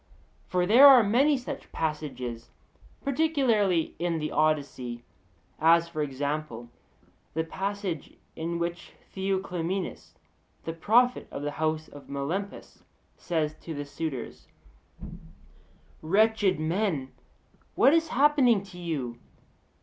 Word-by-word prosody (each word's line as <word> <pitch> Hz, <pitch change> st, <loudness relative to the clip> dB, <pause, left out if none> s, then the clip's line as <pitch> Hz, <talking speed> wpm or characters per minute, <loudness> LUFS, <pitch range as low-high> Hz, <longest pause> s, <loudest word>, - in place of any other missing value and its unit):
For 180 Hz, -1 st, +1 dB
there 240 Hz, +9 st, +8 dB
are 260 Hz, -4 st, +9 dB
many 270 Hz, +8 st, +3 dB
such 250 Hz, -, -7 dB
passages, 140 Hz, -7 st, -4 dB, 0.5 s
particularly 255 Hz, -, +1 dB
in 170 Hz, -1 st, 0 dB
the 155 Hz, -1 st, -3 dB
Odyssee; 140 Hz, -6 st, -1 dB, 0.6 s
as, 165 Hz, +1 st, +5 dB
for 160 Hz, -2 st, -4 dB
example, 140 Hz, -3 st, -3 dB, 0.7 s
the 160 Hz, -, +1 dB
passage 195 Hz, -1 st, -4 dB, 0.2 s
in 170 Hz, +1 st, -3 dB
which 170 Hz, +1 st, -4 dB, 0.2 s
Theoclymenus 190 Hz, -1 st, -3 dB, 0.5 s
the 165 Hz, -, -4 dB
prophet 235 Hz, +9 st, +2 dB
of 140 Hz, -, -6 dB
the 145 Hz, -, -2 dB
house 155 Hz, +1 st, -2 dB
of 145 Hz, -, -13 dB
Melampus 160 Hz, +9 st, -5 dB, 0.3 s
says 155 Hz, -3 st, -2 dB
to 160 Hz, -, -6 dB
the 145 Hz, 0 st, -4 dB
suitors: 145 Hz, -3 st, -6 dB, 1.5 s
'Wretched 205 Hz, +1 st, +2 dB
men! 160 Hz, -4 st, -1 dB, 0.6 s
what 275 Hz, -, +5 dB
is 325 Hz, 0 st, +3 dB
happening 260 Hz, -6 st, +3 dB
to 185 Hz, -2 st, -12 dB
you? 135 Hz, -9 st, -4 dB
170 Hz, 110 wpm, -27 LUFS, 150-205 Hz, 1.5 s, are